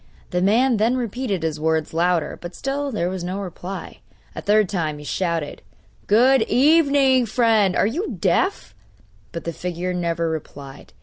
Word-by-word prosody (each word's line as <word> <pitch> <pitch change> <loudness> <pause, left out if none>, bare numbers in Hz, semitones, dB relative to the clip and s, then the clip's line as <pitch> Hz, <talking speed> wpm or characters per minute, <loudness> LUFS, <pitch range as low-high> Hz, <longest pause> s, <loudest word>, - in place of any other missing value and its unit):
The 180 - 0
man 230 +6 +3
then 230 +4 +2
repeated 235 -6 -3
his 160 -2 -2
words 160 0 0
louder; 170 -1 +1
but 175 0 -8
still 280 +1 -3
there 190 -7 -1
was 185 -1 -4
no 185 +3 -3
reply. 190 0 -7 0.3
A - - -6
third 210 0 +3
time 160 -6 -2
he 150 - -10
shouted: 165 -3 -2 0.5
'Good 250 +5 +5
evening, 280 -3 +4
friend! 220 -4 +2
are - - +3
you 315 - -2
deaf?' 380 +2 0 0.6
but 170 - -6
the 170 - -4
figure 180 +2 -4
never 170 -1 -1
replied. 145 -3 -7
190 Hz, 160 wpm, -22 LUFS, 170-245 Hz, 0.6 s, Good